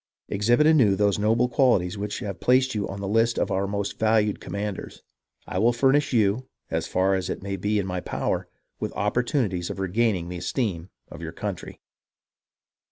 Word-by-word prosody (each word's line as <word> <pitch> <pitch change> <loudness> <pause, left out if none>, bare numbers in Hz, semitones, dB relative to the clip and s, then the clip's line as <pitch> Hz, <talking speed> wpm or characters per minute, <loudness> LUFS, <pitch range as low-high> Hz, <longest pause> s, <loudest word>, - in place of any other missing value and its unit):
Exhibit 120 +8 +3
anew 135 -11 +5
those 100 0 +2
noble 115 +4 +3
qualities 120 -8 +2
which 105 0 -4
have 100 -5 -5
placed 130 +1 +3
you 105 -2 -2
on 95 - -6
the 100 - -3
list 115 +3 +2
of - - 0
our 95 +1 0
most 100 0 -3
valued 110 -2 +2
commanders. 100 -1 -5 0.4
I 90 - -3
will 115 +4 +4
furnish 135 +3 +3
you, 115 +2 +2 0.2
as 80 0 -1
far 95 +1 +2
as 95 -1 -1
it - - -4
may 100 0 -3
be 105 +3 0
in 100 - 0
my 90 -1 -3
power, - - -2 0.3
with - - -3
opportunities 105 - 0
of - - -5
regaining 95 -1 0
the 90 0 -5
esteem 90 -1 -2 0.2
of - - -9
your 80 0 -6
country." 100 0 -6
105 Hz, 180 wpm, -25 LUFS, 95-115 Hz, 0.4 s, anew